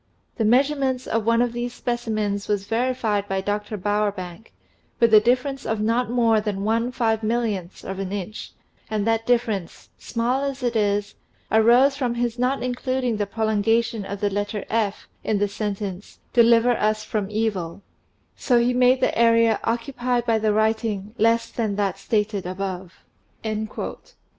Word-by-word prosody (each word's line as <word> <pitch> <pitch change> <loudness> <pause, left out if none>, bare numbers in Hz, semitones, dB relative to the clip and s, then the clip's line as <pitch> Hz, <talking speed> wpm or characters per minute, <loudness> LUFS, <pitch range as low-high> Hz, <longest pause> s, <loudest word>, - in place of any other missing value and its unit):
The 225 - +1
measurements 260 +1 +2
of 225 -1 -1
one 230 +1 +4
of 240 -1 -2
these 240 0 -4
specimens 215 -4 -2
was 205 -2 -1
verified 225 -3 0
by 195 -1 -1
Dr. 205 +2 -3
Bowerbank, 205 -1 -2 0.5
with 230 -2 +4
a 215 - +10
difference 255 +4 0
of 220 -1 -2
not 230 +3 +1
more 230 -3 +3
than 205 -2 -3
one 230 +3 0
five 225 -3 0
millionth 215 -5 -2
of 190 0 -5
an 195 -1 -4
inch, 205 +1 -6 0.4
and 215 -2 -1
that 225 0 0
difference, 230 -8 -1
small 245 +3 -1
as 275 -2 -3
it 240 -1 0
is, 205 -1 0 0.4
arose 240 +5 +5
from 250 -4 -1
his 240 0 -2
not 255 +2 0
including 250 -1 -1
the 205 -1 -1
prolongation 220 +1 0
of 200 +1 -6
the 205 -1 +1
letter/ 205 +1 -3 0.6
in 215 - 0
the 205 +1 +1
sentence 200 -2 -5 0.2
'deliver 235 0 +5
us 215 0 0
from 210 -4 -3
evil 205 -5 -2 0.3
'; - - -43
so 245 - +2
he 240 +1 +2
made 250 +1 +4
the - - +1
area 230 -1 +4
occupied 240 +1 -1
by 225 -2 +2
the 215 0 +1
writing 215 -1 0
less 230 +1 +3
than 215 -4 -2
that 195 -2 -1
stated 210 -2 -1
above." 185 -1 -6
220 Hz, 155 wpm, -23 LUFS, 205-240 Hz, 0.6 s, a